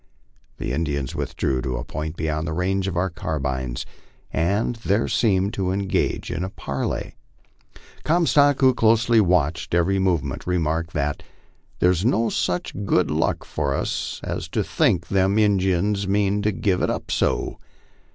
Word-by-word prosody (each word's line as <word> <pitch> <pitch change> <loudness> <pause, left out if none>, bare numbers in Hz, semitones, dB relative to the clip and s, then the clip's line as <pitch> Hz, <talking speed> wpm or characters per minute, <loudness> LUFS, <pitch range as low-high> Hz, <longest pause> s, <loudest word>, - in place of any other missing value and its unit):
The - - -3
Indians 70 -5 -2
withdrew 65 -2 -1
to 65 -1 -2
a - - -4
point 80 +1 -5
beyond 80 0 -2
the 80 - -2
range 95 +3 0
of 90 -3 -3
our 95 +1 0
carbines, 65 -6 -3 0.5
and 100 +9 +1
there 110 -1 0
seemed 100 -3 +1
to 95 -2 -1
engage 100 0 -1
in 85 0 -2
a 95 - -3
parley. 70 -8 -4 0.9
Comstock, 150 -4 +3
who 130 - +7
had 125 - 0
closely 115 +1 +4
watched 85 -3 +1
every 95 +3 +2
movement, 90 -6 -1
remarked 85 -1 0
that 75 -1 -1 0.6
"There's 90 0 +2
no 115 -1 +2
sich 90 0 -1
good 90 -5 +2
luck 80 +2 0
for 70 -3 -1
us - - -3
as - - -4
to - - -1
think 85 -2 +1
them 95 +1 +2
Injuns 100 -1 +2
mean 100 +1 +1
to 105 +1 +1
give 95 -2 0
it - - +1
up - - -3
so. - - 0
90 Hz, 155 wpm, -23 LUFS, 80-100 Hz, 0.9 s, who